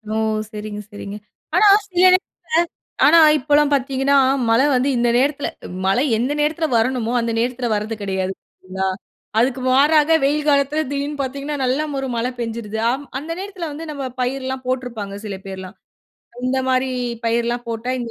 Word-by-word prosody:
ஓ! - - 0 0.3
சரிங்க 210 0 -6
சரிங்க. 205 0 -7 0.4
ஆனா 425 - +6 0.2
சில 365 -3 -4
நேரத்தில, 370 +1 +6 0.9
ஆனா 330 +3 +7 0.2
இப்பல்லாம் 290 +1 +2
பார்த்தீங்கன்னா, 270 +1 +1 0.3
மழை 250 +5 +4
வந்து 255 +2 +2
இந்த 240 0 +2
நேரத்தில 280 +2 +1 0.4
மழை 220 +9 +3
எந்த 255 +5 0
நேரத்தில 315 +2 +1
வரணுமோ, 240 0 0
அந்த 230 0 -1
நேரத்தில 245 0 -1
வர்றது 215 +2 -2
கெடையாது. 190 -1 -2
சரிங்களா! 190 +1 -5 0.5
அதுக்கு 255 +2 +2
மாறாக 300 +4 +4
வெயில் 295 +2 +1
காலத்தில 285 +2 +2
திடீருன்னு 285 0 -3
பார்த்தீங்கன்னா 280 +3 -4
நல்ல 265 +5 +1 0.2
ஒரு 270 - -3
மழை 240 +2 -1
பெஞ்சுருது. 225 -2 -4
அம் 280 +2 -4
அந்த 310 +4 -8
நேரத்தில 380 -5 -5
வந்து 320 +3 -7
நம்ம 280 -2 -5 0.2
பயிர்லாம் 260 +1 -2
போட்ருப்பாங்க 235 -6 -3
சில 200 - -4
பேர்லாம். 190 0 -8 0.7
இந்த 265 +1 +1
மாரி 255 0 +1 0.4
பயிர்லாம் 235 +1 0
போட்டா 230 +2 -3
இந்த 235 -1 -5
255 Hz, 150 wpm, -20 LUFS, 230-290 Hz, 0.9 s, ஆனா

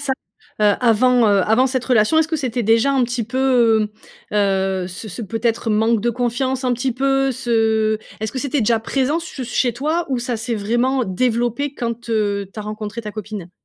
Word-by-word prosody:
ça, 280 -2 -1 0.5
heu, 205 -1 +5
avant, 245 0 +4
heu, 200 -2 +4
avant 235 +5 +4
cette 260 -1 -2
relation 250 +5 +3
est-ce 320 0 +2
que 320 - 0
c'était 250 -4 -2
déjà 225 +6 +3
un 260 -2 +3
petit 240 -1 -2
peu, 235 -3 +2 0.4
heu, - - 0
heu, 190 -2 +1
ce 200 +4 -8
ce 215 +5 -6
peut-être 225 +2 -1
manque 220 +1 +2
de 235 +3 +1
confiance 255 +2 -1
un 250 - +2
petit 245 +1 -1
peu 270 +1 +1
ce 220 -2 +1 0.2
est-ce 220 - -3
que 260 - -3
c'était 280 0 -1
déjà 225 +1 +2
présent 275 +6 0
ce 285 -5 -7
chez 245 0 0
toi 310 +8 -1
ou 260 -2 0
ça 240 -1 -2
s'est 230 +1 -3
vraiment 240 +5 0
développé 240 +7 -1
quand, 235 0 -4
heu, 205 -3 0
tu - - -10
as - - -3
rencontré 215 +2 -6
ta 210 - -5
copine? 210 -4 -7
235 Hz, 200 wpm, -20 LUFS, 215-260 Hz, 0.5 s, heu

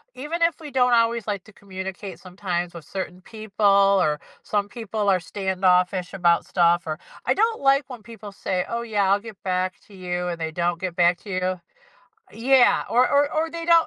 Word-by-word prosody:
even 300 +6 -4
if 335 -2 +2
we 300 - -7
don't 250 -1 +3
always 230 -1 +2
like 200 -3 -2
to 215 - -15
communicate 190 -1 -7
sometimes 180 -2 -4
with 165 -3 -9
certain 185 0 -6
people, 215 +1 -5
or 195 -6 +4 0.2
some 205 -1 -1
people 215 -2 -2
are 190 -1 +4
standoffish 185 0 0
about 175 -3 +2
stuff, 175 -1 +3
or 155 -1 -3 0.3
I - - +3
don't 445 +2 +1
like 275 0 +3
when 250 -3 -9
people 215 -2 -10
say, 185 -2 -2
"Oh 235 0 -2
yeah, 205 -4 +1
I'll 200 - +4
get 220 -2 -12
back 185 0 -1
to 205 - -17
you," 180 -1 -3
and 170 -1 -4
they 160 -1 -3
don't 170 +1 -1
get 185 -2 -4
back 175 0 +4
to - - -11
you 185 -1 -2 0.7
Yeah. 255 +2 +4
Or 250 +2 +4
or 285 +1 +2
or 315 +1 0
they 335 0 -5
don't, 335 -1 +5
195 Hz, 200 wpm, -24 LUFS, 180-235 Hz, 0.7 s, don't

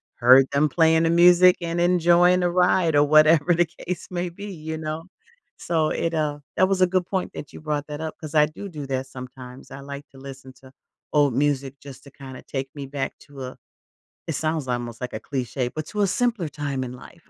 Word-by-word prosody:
heard 130 +2 +6
them 145 +2 +2
playing 160 +1 +3
the 165 - +2
music 180 +1 +6
and 170 0 -2
enjoying 175 +1 +4
the 175 - +2
ride, 180 -2 +2
or 145 - +6
whatever 155 +2 +5
the 175 +1 +3 0.2
case 180 0 -4
may 180 0 -2
be, 200 +4 -9
you 160 -2 -6
know? 155 +1 -5 0.6
So, 160 -2 0
it, 165 - -2
uh 150 -2 -1 0.2
that 185 - +4
was 195 -1 0
a 185 - +6
good 185 0 0
point 190 -2 -3
that 145 - -8
you - - -9
brought 150 -2 -3
that 150 -1 -6
up 160 -1 -5
'cause 155 -1 -8
I 150 -1 +6
do 170 +6 -9
do 150 -5 -7
that 135 0 -3
sometimes, 125 0 -11
I 135 - -8
like 140 +1 -8
listen 135 -1 -11
to 130 -1 -16 0.4
old 145 -3 +3
music 140 -1 -1
just 135 -1 -12
to, 140 - -14
kinda 130 -2 -11
take 135 -1 -5
me 140 -2 -6
back 135 0 -4
to 140 -1 -12
a 130 0 -8 0.7
it 165 - -2
sounds 155 -1 -2
almost 120 -2 -4
like 125 - -5
a - - -4
cliche, 130 -2 -3
but 155 +4 -6
to 210 - -4
a - - +4
simpler 225 -5 0
time 145 -2 -4
in 125 - -7
life. 160 +6 -15
150 Hz, 220 wpm, -23 LUFS, 135-170 Hz, 0.7 s, heard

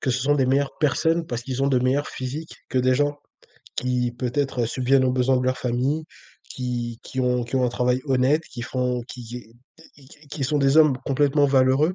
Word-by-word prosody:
que 130 - 0
ce 125 +1 0
sont 145 +2 +3
des 135 -2 +2
meilleures 135 +2 +1
personnes 165 +3 +1
parce 120 -3 -4
qu'ils 130 +1 -3
ont - - +3
de 130 -2 +3
meilleurs 135 +3 +1
physiques 140 +5 -6 0.2
que 130 - +1
des 130 0 +3
gens 145 +2 0 0.6
qui, 125 -1 0
peut-être 125 0 -1
subviennent 130 +3 +2
aux 125 - +1
besoins 130 0 +2
de 125 - -2
leur 130 0 +1
famille, 130 +6 -1 0.4
qui 120 -2 -4
qui 130 - -4
ont 125 -1 +1
qui 120 - -7
ont 130 - +2
un - - +2
travail 125 +1 0
honnête. 135 +4 +2
Qui 120 - -7
font 125 0 -2
qui 120 -1 -8
est 115 -2 -11 0.4
qui 135 -2 -18
q 150 - -18
q - - -18
qui 140 -1 -4
sont 150 +2 +1
des 140 +2 +3
hommes 150 -4 +6
complètement 145 +1 +3
valeureux. 135 +5 +3
130 Hz, 220 wpm, -23 LUFS, 125-140 Hz, 0.6 s, hommes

